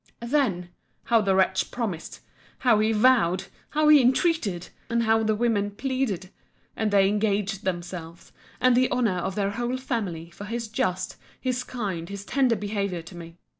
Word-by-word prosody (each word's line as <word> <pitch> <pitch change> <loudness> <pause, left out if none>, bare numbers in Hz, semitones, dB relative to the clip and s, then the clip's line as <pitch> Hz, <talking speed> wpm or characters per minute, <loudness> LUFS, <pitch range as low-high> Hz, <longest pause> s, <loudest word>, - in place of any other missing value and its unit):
Then! 235 -10 0 0.3
how 230 -1 +3
the 195 -2 +2
wretch 190 0 +2
promised!—How 225 +2 -2
he 215 +1 +2
vowed!—How 240 - +2
he 300 -2 +8
entreated!—And 235 - 0
how 225 0 +3
the 215 -1 +1
women 210 -3 +1
pleaded!—And 215 -3 -4
they 200 -1 +4
engaged 205 -1 0
themselves, 175 -2 -5 0.3
and 255 -1 +4
the 255 +1 +3
honour 230 -8 +1
of 190 +2 -3
their 200 -1 0
whole 240 +3 -2
family, 195 - -4
for 200 +4 -9
his 230 +1 -4
just, 185 -3 -2 0.2
his 255 -1 -1
kind, 195 -10 -4
his 200 0 -7
tender 260 -2 +2
behaviour 200 -5 -3
to 175 +2 -12
me. 170 0 -10
210 Hz, 145 wpm, -26 LUFS, 185-240 Hz, 0.3 s, he